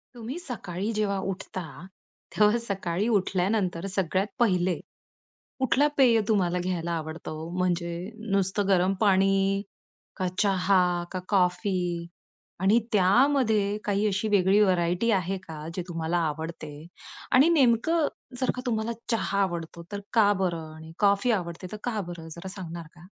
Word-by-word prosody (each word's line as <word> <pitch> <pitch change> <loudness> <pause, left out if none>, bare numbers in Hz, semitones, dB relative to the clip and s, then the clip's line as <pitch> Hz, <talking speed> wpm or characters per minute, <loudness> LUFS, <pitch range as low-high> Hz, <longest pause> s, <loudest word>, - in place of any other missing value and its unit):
तुम्ही 240 +6 -6
सकाळी 210 - -4
जेव्हा 210 -2 0
उठता, 185 -1 -6 0.7
तेव्हा 210 +2 +4
सकाळी 195 -3 -2
उठल्यानंतर, 185 -1 0
सगळ्यात 190 +1 0
पहिले 185 -5 +2 0.8
कुठला 265 +2 +3
पेय 245 -4 +5
तुम्हाला 180 -5 +2
घ्यायला 175 -2 -2
आवडतं 160 -1 -5
ओ? 155 +1 -6
म्हणजे 175 -1 0 0.4
नुसतं 195 +1 +1
गरम 185 0 +3
पाणी? 195 -1 +3 0.6
का 185 - 0
चहा? 195 -2 +3 0.3
का 185 - -3
कॉफी? 185 0 +2 0.8
आणि 195 +5 +4
त्यामध्ये 215 0 +3
काही 205 +1 +1
अशी 205 +2 0
वेगळी 200 0 +4
व्हरायटी 180 +3 +2
आहे 190 -1 0
का, 155 -1 -7
जे 180 - -2
तुम्हाला 165 0 -1
आवडते? 160 0 -6 0.6
आणि 270 +5 +6
नेमकं 295 +2 +3 0.3
जर 255 - +1
का, 250 - -4
तुम्हाला 225 -1 -1 0.2
चहा 200 -3 0
आवडतो 170 -2 -4
तर 205 - -3
का 215 -3 +5
बरं? 165 -3 -3
आणि 160 0 -11
कॉफी 200 +4 +3
आवडते 170 +1 -7
तर, 215 - -5
का 230 -3 -1
बरं? 170 -2 -8
जरा 170 - -7
सांगणार 170 -3 -7
का? 170 0 -15
195 Hz, 135 wpm, -27 LUFS, 175-215 Hz, 0.8 s, आणि